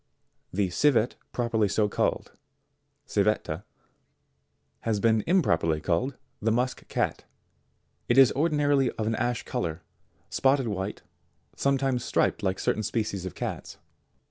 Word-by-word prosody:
63. 100 +2 0
The - - -3
Civet 125 +1 +3 0.2
properly 115 -3 +1
so 105 +2 +1
called, - - -1 0.7
Civetta, 100 -4 0 1.2
has 110 -3 -1
been 110 +1 +3
im 180 +1 +4
properly 80 - +1
called 100 - -1 0.2
the 110 - +1
musk 125 +3 -1
cat. - - -1 0.8
It 120 - +3
is 135 -3 +8
ordinarily 145 -3 +2
of 110 - -3
an 110 - 0
ash 120 +1 -1
colour, 80 -1 -3 0.4
spotted 135 -1 +2
white, 100 0 -4 0.5
sometimes 135 -3 +1
striped - - +1
like 95 -2 0
certain - - 0
species 105 -4 -2
of - - -8
cats. - - -5
110 Hz, 130 wpm, -27 LUFS, 100-135 Hz, 1.2 s, is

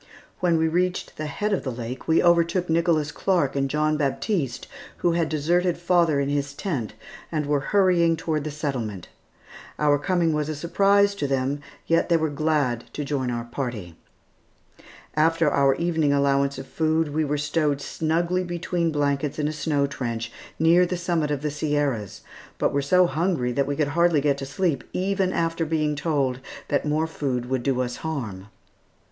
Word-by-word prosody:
When 175 -2 +2
we 160 0 +2
reached 180 +3 -1
the 155 - -3
head 205 +9 -2
of 195 - -1
the 130 - -3
lake, 120 +1 -6
we 160 0 +4
overtook 170 +1 +3
Nicholas 165 -3 +2
Clark 160 -5 0
and 135 0 0
John 155 +1 +1
Baptiste 140 - -1 0.4
who 175 - +5
had 165 -1 0
deserted 170 +4 +1
father 170 -4 +2
in 140 - 0
his 145 0 -2
tent 135 - -3 0.4
and 155 -2 -1
were 145 0 +1
hurrying 180 -4 +4
toward 155 -2 -2
the 155 - -3
settlement. 130 - -4 0.7
Our 145 -1 +3
coming 170 0 +1
was 150 0 -1
a 155 - -2
surprise 200 +6 +3
to 170 -8 -2
them, 135 +1 0 0.3
yet 165 +2 +2
they 170 - +5
were 160 -2 -1
glad 145 -6 0
to 145 - -4
join 135 -3 -1
our 120 -1 -2
party. 120 - -5 1.2
After 165 0 +3
our 135 -1 +3
evening 160 -3 +1
allowance 140 -1 +2
of 135 - -6
food 160 0 0
we 155 +1 +1
were 150 0 -1
stowed 145 -1 0
snugly 170 +5 -1
between 175 -1 -1
blankets 145 -1 0
in 150 -1 0
a 155 - -2
snow 150 -2 0
trench 115 -5 -4 0.3
near 165 +3 +5
the 180 0 -1
summit 170 -3 0
of 145 -1 -2
the 150 - -1
Sierras, 145 -8 -1 0.4
but - - +1
were 140 - +1
so 180 +6 +4
hungry 165 -7 0
that 140 +3 0
we 145 - -1
could 145 0 0
hardly 170 0 +3
get 140 -1 +1
to 135 - -5
sleep, 155 +1 -1
even 190 0 0
after 165 -1 0
being 155 -2 0
told 140 -4 0 0.3
that 145 +1 0
more 155 +2 +1
food 135 -6 -2
would 130 -2 +1
do 130 0 0
us 125 -1 -3
harm. 115 -12 -5
150 Hz, 180 wpm, -24 LUFS, 140-170 Hz, 1.2 s, who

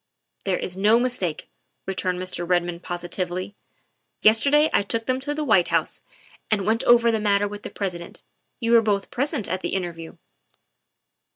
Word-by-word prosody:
" - - -36
There 190 -2 +1
is 180 - -5
no 210 +4 +4
mistake," 240 -10 -2 0.4
returned 185 -1 -2
Mr. 185 -1 -4
Redmond 175 -1 0
posi 175 0 -5
tively; 180 +2 -3 0.2
' - - -45
' - - -51
yesterday 280 +8 +5
I - - +4
took 225 +3 -2
them 255 0 0
to 290 +2 -4
the 305 - -2
White 215 -10 +4
House - - -1 0.5
and 205 -3 +1
went 225 +2 +1
over 235 -1 +5
the 220 - 0
matter 205 -1 +2
with 205 0 -8
the - - -7
President. 175 -4 -5 0.4
You 230 -2 -1
were 230 -1 +7
both 205 -3 -1
present 275 - -1
at 185 +2 -2
the - - -2
interview. 170 -3 -5
200 Hz, 185 wpm, -24 LUFS, 180-230 Hz, 0.5 s, were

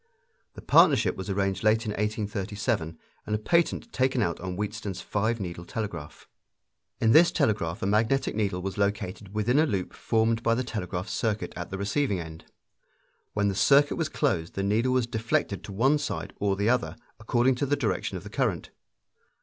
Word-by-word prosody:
The - - -10
partnership - - +5
was 95 +2 -6
arranged 95 0 -1
late 110 +2 +3
in 105 - -2
1837, 105 -3 -2 0.3
and 105 - 0
a - - +1
patent 170 - 0
taken 130 -2 +1
out 85 -3 -2
on 90 0 -5
Wheatstone's 105 -1 -4
five 110 +3 -1
needle 85 -3 -5
telegraph. 90 -7 -6 0.7
In 115 - +3
this 170 +7 +7
telegraph 105 - 0
a - - +1
magnetic 110 +7 +1
needle 100 -4 -1
was 95 +1 -4
located 100 -1 -2
within 120 +6 +2
a 160 - +4
loop 95 -8 -2
formed 115 0 +1
by 115 0 +2
the 130 - -1
telegraph 95 -5 -4
circuit 110 -1 -2
at 90 - -6
the 95 - -4
receiving 100 +1 0
end. 80 -1 -9 0.9
When 105 -1 +1
the 100 - 0
circuit 140 +8 +4
was 160 -2 -1
closed 95 - -1
the 95 - -1
needle 115 +6 +1
was 130 -2 +2
deflected 110 -3 -1
to - - -8
one 135 +9 +3
side 145 - -4
or 100 -1 +1
the 100 +2 0
other, 115 -10 +1 0.2
according 120 +4 +2
to 140 - -1
the 145 - +2
direction - - -2
of - - -9
the - - -10
current. - - -1
105 Hz, 180 wpm, -27 LUFS, 95-120 Hz, 0.9 s, this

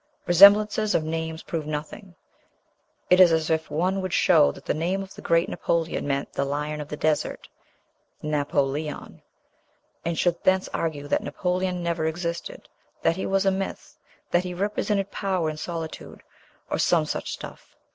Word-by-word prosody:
Resemblances 205 +4 +6
of 155 - +2
names 160 0 -4
prove 160 -3 -4
nothing; 155 +5 -6 1.0
it 180 - +7
is 180 -2 +8
as 160 0 +1
if 160 0 0
one 185 +5 0
would 185 -1 -4
show 160 -5 +5
that - - -14
the - - 0
name 180 +5 -1
of 195 - -12
the - - -11
great 165 +1 +2
Napoleon 165 -3 -1
meant 140 0 -2
"the 140 - 0
lion 150 +2 -3
of 145 - -7
the 150 - -6
desert" 155 -1 -1 0.8
(Napo 145 -2 +1
leon), 145 +2 -5 0.8
and 170 -1 -2
should 175 -1 0
thence 190 0 +3
argue 150 -3 -2
that - - +1
Napoleon 180 -1 -2
never 170 -2 -1
existed, 170 +1 -4 0.4
that 165 - +3
he 190 - -3
was 195 0 +1
a 195 - +4
myth, 190 0 -5 0.4
that 175 - +3
he 180 -1 -5
represented 200 +1 -1
power 185 -5 -1
in 155 - -8
solitude, 165 0 -6 0.5
or - - 0
some - - +3
such - - -4
stuff. - - -9
170 Hz, 165 wpm, -25 LUFS, 155-185 Hz, 1.0 s, is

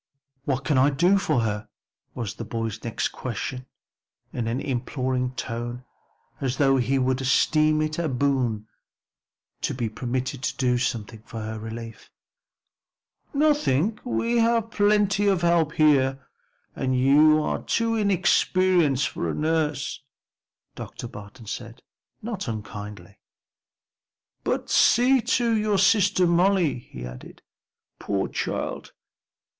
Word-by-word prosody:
"What 135 -1 -1
can 130 0 +2
I 135 +2 +5
do 175 +8 +3
for 130 - +1
her?" 105 -1 -3 0.5
was 115 -5 -4
the - - -7
boy's 115 -1 -4
next 115 - -2
question 130 +1 -5 0.7
in 120 -2 -2
an 120 +3 -1
imploring 130 -1 -2
tone 120 +1 -5 0.5
as 130 -1 -2
though 135 -2 +4
he 130 +2 +1
would 130 0 +1
esteem 155 +3 +3
it 155 +1 -3
a 165 -2 0
boon 125 -5 0 0.9
to - - -2
be 120 -3 -2
permitted 125 +3 -3
to - - -3
do 125 -2 +1
something 115 -3 -3
for 115 0 -8
her 110 0 -5
relief. 115 0 -8 1.2
"Nothing; 280 - +2
we 240 -1 0
have 230 -1 +2
plenty 205 -1 +2
of 190 -3 +2
help 170 -2 +3
here, 135 -3 +3 0.5
and 130 -1 0
you 150 +4 +5
are - - -2
too 230 0 0
inexperienced 185 - +2
for - - -3
a - - -2
nurse," 155 -3 -1 0.7
Dr. 120 - -8
Barton 105 +2 -11
said, 115 +1 -7 0.4
not 215 - -4
unkindly. 105 -3 -7 1.2
"But - - -1
see 250 +2 +5
to 230 0 +1
your 215 -2 +1
sister 195 -1 +4
Molly," 175 -4 +2
he 60 - -10
added. 60 0 -11 0.6
"Poor 100 -1 -1
child! - - -4
135 Hz, 125 wpm, -25 LUFS, 120-185 Hz, 1.2 s, I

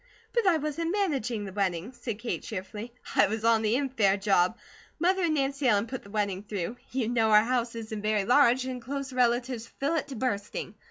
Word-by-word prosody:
"But 470 -4 +2
I 345 -3 +5
wasn't 315 +2 -2
managing 270 - -1
the 190 - -7
wedding," 195 +2 -1
said 230 -3 -5
Kate 230 +2 -3
cheerfully. 210 +3 -6 0.2
"I - - +6
was 220 +2 -3
on 230 -1 +4
the 220 +1 +2
infare 230 -8 +2
job. 195 +1 +2 0.4
Mother 370 +3 +2
and 315 -2 +1
Nancy 275 -1 0
Ellen 210 -2 +3
put 255 +2 -6
the 200 - -15
wedding 200 -2 -1
through. 205 +1 -4
You 250 -3 -1
know 230 -2 +2
our 210 0 +7
house 240 -1 -1
isn't 220 -2 -5
very 210 -1 +1
large, 250 +1 +4
and 255 -1 -4
close 275 +2 -5
relatives 245 -1 +1
fill 280 +6 -2
it 320 -3 -1
to 275 - -7
bursting. 210 -4 -3
235 Hz, 205 wpm, -28 LUFS, 210-270 Hz, 0.4 s, our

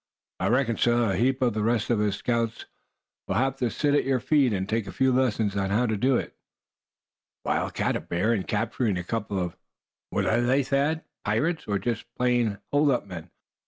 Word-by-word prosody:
I - - 0
reckon, 120 -2 +1
suh, 120 -3 +2
a - - 0
heap 130 +6 +1
of 120 -3 +2
the 110 - -1
rest 115 +1 +1
of 110 -3 +2
us 105 -2 +1
scouts'll 115 0 -5
have 135 +2 +1
to 125 -3 0
sit 145 +5 0
at 145 - +3
your 135 -1 +1
feet, 130 0 +3
and 95 -2 -1
take 110 -1 -1
a - - -5
few 130 +3 +2
lessons 110 -5 +1
on 100 -1 0
how 110 +5 +2
to 110 -2 0
do 130 +6 +2
it." - - -5 1.1
"A - - -2
wild - - -1
cat; - - 0
a - - 0
bear; 95 +7 0
and 100 -5 -2
capturing 110 -1 0
a 90 - -3
couple 105 0 -3
of 90 -2 -2 0.5
what - - -1
are 115 +2 +2
they, 130 +3 +2
Thad, 145 +4 0 0.2
pirates, 150 +11 0
or 100 -1 +1
just 115 +3 -3
plain 120 -4 +1
hold 145 +1 +3
up 125 -6 +1
men? 90 -3 -8
115 Hz, 210 wpm, -26 LUFS, 105-130 Hz, 1.1 s, at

